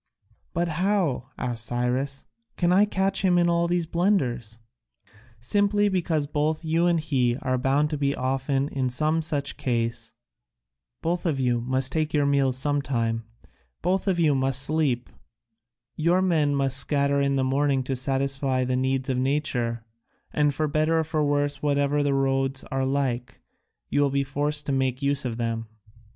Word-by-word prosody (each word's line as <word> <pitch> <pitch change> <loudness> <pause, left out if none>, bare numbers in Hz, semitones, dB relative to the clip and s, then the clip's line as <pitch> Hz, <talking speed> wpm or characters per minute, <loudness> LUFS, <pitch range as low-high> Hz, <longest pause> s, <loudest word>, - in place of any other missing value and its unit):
"But 170 +1 +1
how," 170 -6 0
asked 120 -3 -2
Cyrus, 125 +4 -1 0.3
"can 175 0 +2
I 200 +3 +5
catch 195 -1 0
him 185 -2 +3
in 175 0 +3
all 170 0 +2
these 175 -1 0
blunders?" 140 - 0 0.8
"Simply 205 - +2
because 170 -5 0
both 155 +2 -1
you 165 +2 +2
and 170 -1 +2
he 130 -6 0
are 130 -1 0
bound 140 +4 +1
to 150 - -2
be 140 -1 +1
often 135 +2 -1
in 130 -2 -1
some 155 +5 +1
such 145 -3 -2
case; 115 -2 -2 0.9
both 175 +2 -1
of 145 -5 0
you 120 -2 +1
must 130 +2 +1
take 155 0 -1
your 145 -1 +3
meals 140 -2 +2
sometime; 130 -5 -1 0.6
both 185 +3 0
of 185 -3 +1
you 155 -3 +4
must 135 0 +1
sleep; 140 -5 0 0.9
your 175 +4 +2
men 155 -6 +2
must 135 -1 +1
scatter 140 0 +1
in 140 0 +1
the 135 - +1
morning 135 0 +1
to 130 +1 -2
satisfy 135 0 0
the 125 0 -1
needs 130 0 0
of 130 -2 0
nature, 125 -4 -1 0.5
and, 150 -1 +2
for 155 +1 0
better 155 +2 +1
for 155 -1 -1
worse, 145 0 0
whatever 145 0 +1
the 140 -1 +1
roads 135 0 0
are 135 -1 0
like, 130 -3 -2 0.5
you 145 - +1
will 140 - +3
be 140 0 0
forced 145 +2 -1
to - - -2
make 130 0 -1
use 140 -1 +1
of 115 -2 -3
them. 115 -1 -3
140 Hz, 165 wpm, -25 LUFS, 130-155 Hz, 0.9 s, I